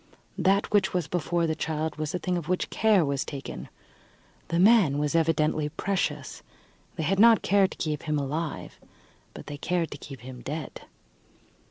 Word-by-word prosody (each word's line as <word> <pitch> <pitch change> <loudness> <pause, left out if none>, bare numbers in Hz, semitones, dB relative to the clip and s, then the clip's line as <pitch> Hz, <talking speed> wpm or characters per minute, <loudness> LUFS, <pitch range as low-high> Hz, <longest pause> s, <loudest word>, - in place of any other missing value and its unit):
That 195 +2 +2
which 205 -2 +2
was 175 -4 0
before 170 +1 0
the 160 - 0
child 155 0 -3
was 155 +2 -3
a - - +1
thing 180 0 -2
of 170 -2 -4
which 185 - -1
care 210 -6 +3
was 140 -1 -1
taken: 140 -2 -7 0.8
the 170 - -1
man 185 -7 +5
was 150 +1 0
evidently 155 -2 +1
precious. 190 +5 -2 0.5
They 160 - -3
had 190 +5 +1
not 230 0 +6
cared 195 -1 +3
to - - -11
keep 150 -2 -2
him 150 -2 -1
alive, 150 +3 -4 0.6
but - - -9
they 145 - -7
cared 170 +1 -1
to 145 - -7
keep 135 -4 -10
him 125 0 -9
dead. 150 +2 -6
160 Hz, 175 wpm, -27 LUFS, 150-180 Hz, 0.8 s, not